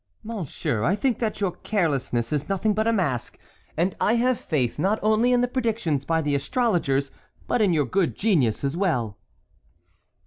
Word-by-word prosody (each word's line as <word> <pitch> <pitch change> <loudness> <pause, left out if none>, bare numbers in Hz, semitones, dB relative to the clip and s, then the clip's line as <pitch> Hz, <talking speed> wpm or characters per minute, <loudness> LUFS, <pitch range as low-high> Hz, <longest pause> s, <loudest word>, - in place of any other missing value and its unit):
"Monsieur, 185 - -3
I 190 - +2
think 240 +2 0
that 220 -3 -2
your 195 -3 0
carelessness 140 - -1
is 150 +3 -2
nothing 195 +2 +1
but 220 +2 0
a - - +4
mask, 145 - -1 0.4
and 175 +3 +1
I 215 - +3
have 250 +1 +2
faith 130 -7 -1
not 200 +4 +2
only 220 +3 +3
in 245 -1 +4
the 245 - +2
predictions 225 - -1
by 165 -1 +1
the 145 -1 0
astrologers, 140 - 0 0.4
but 245 - +1
in 200 -4 +4
your 150 -4 +2
good 185 +7 0
genius 155 - +1
as 140 +2 -1
well." 125 - -1
185 Hz, 175 wpm, -24 LUFS, 140-220 Hz, 0.4 s, a